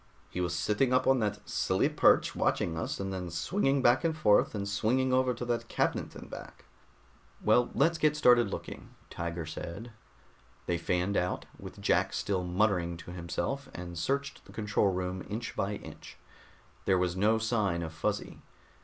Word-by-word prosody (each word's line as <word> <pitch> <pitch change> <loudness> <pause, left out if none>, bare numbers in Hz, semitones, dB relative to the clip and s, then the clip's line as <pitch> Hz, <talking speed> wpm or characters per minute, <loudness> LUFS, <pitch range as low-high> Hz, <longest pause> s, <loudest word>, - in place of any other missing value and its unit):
"He 90 - -3
was 85 0 -1
sitting 105 +9 +1
up 130 0 +3
on 135 -1 +4
that 105 -2 -2
silly - - +1
perch - - +4
watching 80 - 0
us, 80 - -3
and 95 0 -3
then 90 -2 -4
swinging 135 - 0
back 120 +5 +4
and 160 -1 0
forth 105 -6 +4
and 100 -1 -3
swinging 125 +6 +1
over 130 0 +3
to 120 - -5
that 120 -1 -1
cabinet - - -1
and - - -9
back." - - -10 0.7
"Well, 120 +3 +3
let's 165 +3 +3
get 155 -1 +3
started 120 -6 +5
looking," - - -7 0.2
Tiger 85 -1 -4
said. 85 +8 -7 0.7
They 85 -1 -1
fanned 90 +3 0
out, 90 0 -1
with - - -10
Jack - - +2
still 95 -3 -1
muttering 90 -2 +1
to 85 - -10
himself, 90 +11 -3
and 85 0 -6
searched 140 +10 -2
the - - -15
control 105 -2 +1
room 90 0 -3
inch 115 +3 -4
by 100 +2 -1
inch. - - -11 0.7
There 95 - +4
was 90 -1 0
no 105 +4 +3
sign 110 -7 0
of 80 -1 -6
Fuzzy. - - -3
105 Hz, 170 wpm, -30 LUFS, 90-120 Hz, 0.7 s, started